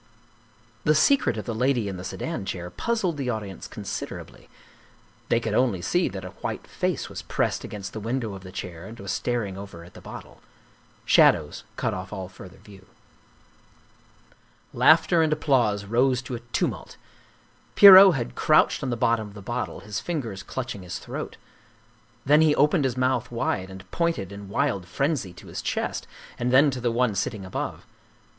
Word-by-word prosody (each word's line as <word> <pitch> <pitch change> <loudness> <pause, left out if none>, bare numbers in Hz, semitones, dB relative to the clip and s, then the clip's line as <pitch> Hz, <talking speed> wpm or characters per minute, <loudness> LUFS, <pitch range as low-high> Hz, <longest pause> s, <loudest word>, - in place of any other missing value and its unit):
The 155 - +3
secret 155 - +3
of 105 - -5
the 115 - -3
Lady 125 -1 +1
in 95 - -4
the 90 - -7
Sedan 160 - -4
Chair 90 -2 -5
puzzled 190 - -1
the 135 -3 -2
audience 105 -5 -5
considerably - - -7 0.8
they 115 - +3
could 110 -2 -3
only 115 -5 +2
see 180 0 +1
that 95 -2 -7
a - - -6
white - - -4
face - - -2
was - - -7
pressed - - -1
against 100 -2 -7
the 110 - -5
window 115 0 -2
of 95 - -8
the 95 -1 -11
chair 90 -2 -7
and 115 +2 -11
was 100 -1 -4
star 120 -3 -1
ing 95 -1 -7
over 100 -4 -9
at 85 - -15
the - - -12
bottle. - - -11 0.6
Shadows - - +4
cut - - -1
off 95 0 -6
all 95 -3 -6
further 95 0 -13
view. 95 -2 -16 1.9
Laughter 165 +2 +5
and 160 -1 +2
applause 125 -10 +1
rose 125 +4 +2
to 130 - -7
a 120 - -3
tumult. - - -2 0.8
Pierrot 195 -3 +10
had 120 -3 -3
crouched 155 0 +3
on 135 - -2
the 120 - -1
bottom 115 -1 +1
of 100 - -14
the 105 - -9
bottle, - - -4
his 105 +1 -4
fingers 115 - -4
clutching 120 +1 -5
his 90 -1 -6
throat. - - -7 0.9
Then 150 +3 +5
he 155 -2 +4
opened 150 +1 +3
his 130 -1 -1
mouth 125 -2 +1
wide 95 -5 -2
and 95 0 -12
pointed 165 - -1
in 100 -1 -9
wild 100 -2 -1
frenzy 135 - -1
to 90 - -14
his - - -6
chest - - -3 0.3
and 125 0 0
then 140 +3 +6
to 125 -1 -5
the 120 -1 +1
one 120 -1 +1
sitting 100 0 -3
above. 95 - -5
115 Hz, 180 wpm, -25 LUFS, 95-135 Hz, 1.9 s, Pierrot